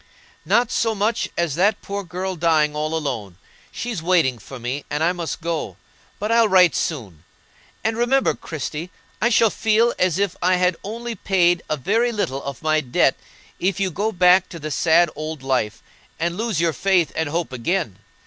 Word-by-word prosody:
"Not 240 0 +2
so 225 -3 +1
much 210 +3 0
as 170 -4 0
that 200 +6 +1
poor 200 0 -4
girl 185 +1 -4
dying 155 -3 +2
all 155 +1 -2
alone. 110 - -4 0.3
She's 230 -8 -4
waiting 160 -8 +2
for 135 +5 -10
me, 125 +4 -4
and 150 +2 -1
I 175 +2 +3
must 170 -1 -5
go. 165 -1 -3 0.4
But 210 +2 -2
I'll 230 -1 +5
write 180 -3 +6
soon; 105 - -3 0.6
and 225 0 0
remember, 250 +3 +2
Christie, 155 +2 -6 0.3
I 235 - +3
shall 225 -2 +4
feel 225 +2 +2
as 180 -2 +2
if 200 -2 0
I 185 +1 +3
had 180 -1 +2
only 235 +3 -5
paid 175 -4 +2
a 155 - 0
very 225 - +1
little 140 - -2
of 140 +2 -7
my 155 0 +2
debt 125 -4 +2 0.4
if 190 +1 0
you 190 -2 0
go 205 +7 -1
back 180 -1 +4
to 170 - -8
the 155 -1 -6
sad 165 +2 +3
old 155 -1 -6
life, 125 -5 -1 0.4
and 170 +1 -1
lose 220 -4 -1
your 165 -1 +2
faith 180 -3 +2
and 160 -2 -1
hope 165 -2 -2
again. 130 - -2
175 Hz, 185 wpm, -22 LUFS, 155-200 Hz, 0.6 s, write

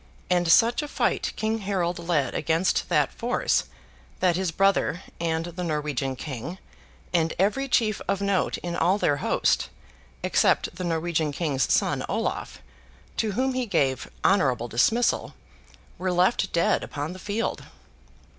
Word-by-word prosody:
And 175 -2 +3
such 235 - +5
a 295 - -5
fight - - 0
King 220 +1 -1
Harold 185 -4 -1
led 165 -5 0
against 165 +4 +1
that - - +2
force, - - 0 0.5
that 180 -2 +3
his 185 0 0
brother, 195 -1 +1 0.2
and 165 -1 -1
the 175 +1 -5
Norwegian 150 -5 -2
King, 135 +5 -6 0.6
and 165 -2 +1
every 215 +9 +1
chief 220 -5 +1
of 200 -1 0
note 200 -2 0
in 175 -1 -3
all 180 +4 +2
their 145 -8 +1
host, - - +1 0.5
except - - +2
the - - -5
Norwegian 165 -2 0
King's 145 -3 0
son, - - +2
Olave, - - -3 0.6
to 215 -2 0
whom 260 +5 0
he 255 -1 -1
gave 135 - 0 0.2
honourable 130 - +3
dismissal, 220 - +1 0.6
were 185 0 0
left 180 +6 +2
dead 170 - +2
upon 145 +4 -4
the 185 - -10
field. 210 +4 -3
175 Hz, 145 wpm, -25 LUFS, 155-200 Hz, 0.6 s, such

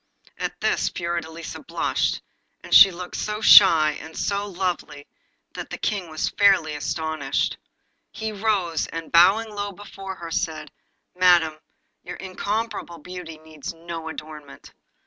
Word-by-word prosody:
At - - -4
this - - +1
Fiordelisa 170 -1 -5
blushed, - - -1 0.4
and - - -6
looked 180 -1 -7
so 210 0 -3
shy 165 -8 +8
and 160 0 -11
so 200 0 -1
lovely, 180 -6 -4 0.5
that - - -7
the - - -6
King 195 -6 -2
was 155 0 -2
fairly 195 -6 +4
astonished. 160 0 -2 0.5
He 220 0 -4
rose, 200 -6 -1
and 165 -1 -7
bowing 205 +6 +5
low 205 0 -4
before 195 -1 -9
her, 170 -2 -9
said 160 -2 -3 0.4
'Madam, 175 -3 +4 0.5
your - - -8
incomparable 200 -1 -4
beauty 175 -1 -9
needs 155 0 -9
no 165 -1 -7
adornment. 150 -2 -10
175 Hz, 125 wpm, -23 LUFS, 160-200 Hz, 0.5 s, shy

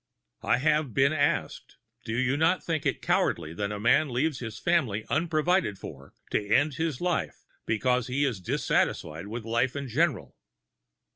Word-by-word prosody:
I - - +2
have 150 -2 +1
been 140 +2 +4
asked: 145 -1 -1 0.3
"Do 110 +1 -2
you 130 +2 +1
not 165 +5 +2
think 160 -3 -1
it - - -2
cowardly 80 -1 0
when 100 +3 -3
a 105 - -4
man 140 +7 +3
leaves 130 +3 0
his 115 -3 -6
family 125 -12 0
unprovided 160 - +1
for, 70 -7 -11 0.2
to - - +1
end 140 +9 +2
his 160 -3 -2
life, 175 -1 -2 0.2
because 125 +2 +1
he 135 +3 +1
is 115 -9 -2
dissatisfied 80 -1 -1
with 110 +1 -6
life 120 +3 0
in 140 -1 -4
general?" 150 +3 0
130 Hz, 160 wpm, -27 LUFS, 110-155 Hz, 0.3 s, been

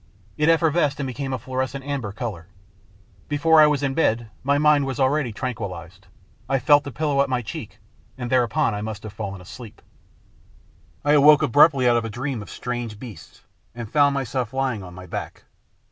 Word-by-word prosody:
It 150 +1 +2
effervesced, 160 -3 +2
and 140 - -2
became 135 +1 -4
a 130 - -1
fluorescent 130 +2 -4
amber 140 -8 -3
colour. 100 -7 -6 0.8
Before 160 +2 +4
I 150 - +7
was 145 -1 0
in 135 -1 0
bed 120 -7 0
my 140 +2 +2
mind 150 -2 +3
was 130 -3 -4
already 135 -1 +1
tran 125 +4 -3
quillised. 95 -3 -8 0.4
I 135 - +2
felt 145 +2 +4
the 140 - -5
pillow 145 +1 0
at 140 - 0
my 125 -1 -1
cheek, - - -8 0.4
and 125 -2 -5
there 130 -1 +5
upon 120 +2 0
I 105 - -4
must 110 -1 -6
have 110 -2 -8
fallen 100 -3 -6
asleep. 110 +4 -11 1.3
I 145 - +3
awoke 150 0 +6
abruptly 140 0 +5
out 120 -1 +4
of 115 - -1
a - - -4
dream 125 +2 -4
of 100 - -10
strange 120 -3 -5
beasts, 105 -9 -12 0.3
and 120 -3 -7
found 145 -2 +3
myself 130 -2 -3
lying 130 -5 -1
on 90 -2 -10
my 90 0 -10
back. - - -7
130 Hz, 190 wpm, -23 LUFS, 110-145 Hz, 1.3 s, I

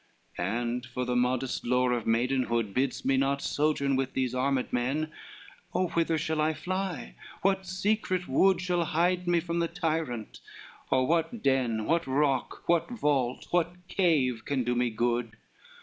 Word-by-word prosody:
LXXIII 90 - -7
"And 120 +3 -2
for 125 0 -3
the 125 0 -1
modest 125 +1 0
lore 125 +1 +2
of 120 -2 -2
maidenhood, 115 -2 +1
Bids 130 +2 -1
me 135 0 +3
not 135 +1 +1
sojourn 145 -2 +1
with 135 0 -1
these 130 -2 -1
armed 130 0 0
men, 135 +6 0 0.6
O 185 -1 +1
whither 165 -1 +1
shall 155 0 -1
I 155 +1 +1
fly, 180 - -3 0.3
what 190 -1 +1
secret 185 -1 0
wood 185 +6 +3
Shall 180 -1 +1
hide 175 +3 +1
me 175 -1 +3
from 170 0 -2
the 170 - +1
tyrant? 160 - -3 0.5
or 130 -1 +3
what 165 - 0
den, 125 -5 +1
What 170 +3 +1
rock, 135 -1 0
what 170 -1 +2
vault, 145 - 0
what 175 +1 -1
cave 140 - +2
can 140 -3 -1
do 120 +1 0
me 125 0 +1
good? 120 0 -1
140 Hz, 165 wpm, -29 LUFS, 125-170 Hz, 0.6 s, me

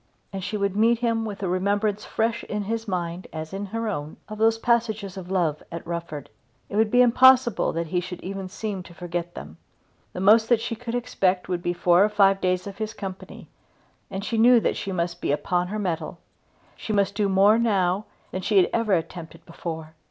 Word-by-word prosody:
And 190 -1 -4
she 210 +3 -3
would 200 -1 -1
meet 230 +3 +4
him 230 -1 0
with 205 -2 -5
the - - 0
remembrance 200 +3 0
fresh 230 +1 -1
in 210 0 -3
his 225 +2 -3
mind 175 -2 -3
as 155 +2 -6
in 200 +1 -4
her 225 +3 -3
own 150 -7 -4
of 215 0 -8
those 225 0 +4
passages 220 -4 0
of 185 -2 -8
love 170 -6 0
at 170 -1 -6
Rufford. 170 -4 -5 0.4
It - - -6
would 220 0 +3
be 245 +2 +5
impossible 255 -1 +5
that 170 +1 -2
he 175 +3 -1
should 180 0 -6
even 195 0 -5
seem 205 -1 -4
to 175 -1 -14
forget 175 -1 -5
them. 75 +3 -9 0.6
The - - -5
most 220 +4 +5
that 240 -2 +4
she 230 0 -3
could 235 +1 -5
expect 195 -7 0
would 180 -1 -2
be 175 - -1
four 175 +1 +4
or 210 - +3
five 195 -2 +3
days 185 0 0
of 200 0 -8
his 215 0 -4
company, 190 -2 -8 0.6
and 195 +1 -5
she 225 0 -1
knew 240 +1 +7
that - - 0
she 195 - -4
must 175 -1 -2
be - - 0
upon 175 +5 0
her 210 +3 -4
mettle. 180 -6 -3 0.6
She - - -6
must 200 -1 +2
do 205 -1 0
more 200 +4 +5
now 200 -3 +1 0.3
than 185 - -3
she 205 +2 +1
had 185 - +4
ever 230 -3 +1
attempted 165 -1 -4
before. 160 -2 -7
195 Hz, 210 wpm, -25 LUFS, 175-220 Hz, 0.6 s, knew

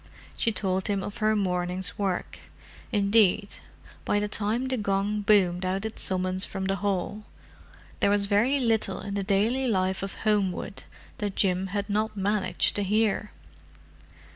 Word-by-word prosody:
She 230 - +1
told 190 -3 -1
him 200 -2 0
of 205 - -6
her 215 0 +2
morning's 180 -2 -1
work—indeed, 200 +1 0 0.5
by - - +1
the 205 0 0
time 215 +5 -1
the 260 - 0
gong 205 -1 0
boomed 190 -4 +3
out 190 +3 -1
its 220 - -5
summons 185 0 -1
from 190 -1 -3
the 195 0 0
hall, 205 +2 -2 0.8
there - - +3
was 205 0 +3
very 225 +8 +2
little 225 -6 +1
in 200 - -5
the 200 - -1
daily 215 +7 +1
life 190 -4 0
of 195 0 -4
Homewood 200 -3 0 0.3
that 205 -2 -2
Jim 185 -1 +1
had 200 +1 -3
not 215 +1 -1
managed 200 0 +1
to 205 - 0
hear. 210 +1 +1
200 Hz, 150 wpm, -27 LUFS, 190-215 Hz, 0.8 s, boomed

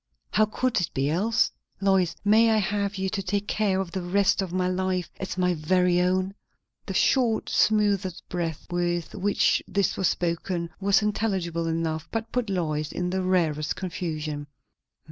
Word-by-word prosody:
How 215 - +4
could 245 0 0
it 170 - -1
be 135 +2 +1
else? 220 +8 +2 0.3
Lois, 190 -3 +2
may 220 +3 +5
I 220 - +3
have 200 0 0
you, 190 -1 -1
to 200 0 -2
take 200 +2 -2
care 200 -3 +1
of 190 -3 -3
the 190 - -3
rest 195 +3 +2
of 190 -3 -4
my 180 0 0
life, 185 -1 -1
as 190 -1 -4
my 180 -1 +2
very 180 +2 +2
own?" 185 +1 +1 0.5
The - - -4
short, 240 -5 +2
smothered 200 -4 +2
breath 170 -4 -3
with 175 -1 -1
which 205 0 +2
this 200 -3 0
was 190 - +2
spoken 170 0 -2
was 200 +1 +3
intelligible 190 -6 -1
enough, 160 -1 -2
and 225 0 -3
put 245 -4 -1
Lois 155 -5 -1
in 180 0 -2
the 190 0 0
rarest 165 -5 +1
confusion. 155 -5 -4
185 Hz, 165 wpm, -26 LUFS, 170-200 Hz, 0.5 s, may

